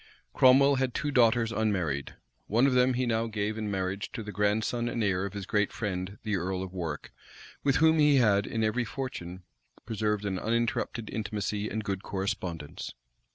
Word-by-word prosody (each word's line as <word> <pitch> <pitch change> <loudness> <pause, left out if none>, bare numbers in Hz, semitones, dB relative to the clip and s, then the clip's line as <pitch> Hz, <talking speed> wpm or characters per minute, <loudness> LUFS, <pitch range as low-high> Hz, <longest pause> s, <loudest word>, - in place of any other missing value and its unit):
Cromwell 135 +2 +6
had 130 -2 -1
two 145 - -1
daughters 115 -3 +4
unmarried; 90 -12 -1 0.3
one 115 +5 +3
of 135 - +3
them 125 0 +4
he 130 +1 +1
now 115 -1 0
gave 105 -1 -2
in 110 -1 -3
marriage 95 0 -2
to 115 - -4
the 105 - -6
grandson 110 +4 0
and 115 -1 -1
heir 95 -1 +1
of 100 - -10
his 100 -2 -5
great 105 -1 +1
friend 95 -2 -4
the 105 -3 0
earl 95 +1 -2
of 95 -1 -8
Warwick, 85 -5 -5 0.5
with 140 -1 +3
whom 160 +1 +4
he 150 -1 +5
had, 105 -6 +4
in 110 -1 -1
every 110 +3 +1
fortune, 95 -8 -6 0.4
preserved 105 -2 -1
an 95 -2 -1
uninterrupted 115 0 -1
intimacy 105 -1 -2
and 110 0 -3
good 95 -2 -3
correspondence. 90 -6 -4
105 Hz, 180 wpm, -29 LUFS, 95-120 Hz, 0.5 s, Cromwell